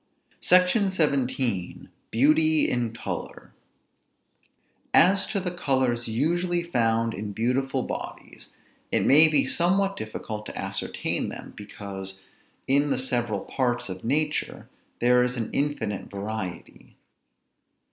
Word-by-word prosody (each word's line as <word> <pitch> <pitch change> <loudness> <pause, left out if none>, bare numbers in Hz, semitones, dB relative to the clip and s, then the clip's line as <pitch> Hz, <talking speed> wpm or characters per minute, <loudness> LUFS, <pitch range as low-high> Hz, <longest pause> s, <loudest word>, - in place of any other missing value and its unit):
SECTION 185 +3 +4
XVII. 130 - -1 0.2
BEAUTY 155 +5 +3
IN 120 -2 -1
COLOR. 115 - -6 1.4
As 190 +4 +5
to 200 - -1
the 180 -1 -3
colors 130 -8 0
usually 170 +9 0
found 115 -7 0
in 105 0 -5
beautiful 130 +4 0
bodies, - - -7 0.4
it - - +1
may 155 +4 +8
be 150 -4 +3
somewhat 195 +7 +2
difficult 110 0 -6
to - - -8
ascertain 95 0 -2
them, - - -9
because, 95 -2 -7 0.5
in 140 +2 +2
the - - +1
several 120 -6 -1
parts 120 -3 -2
of 95 0 -7
nature, 150 +5 -1 0.3
there 125 +1 +5
is 125 0 0
an 115 - -3
infinite 140 -8 -2
variety. 100 -2 -6
125 Hz, 115 wpm, -25 LUFS, 110-155 Hz, 1.4 s, may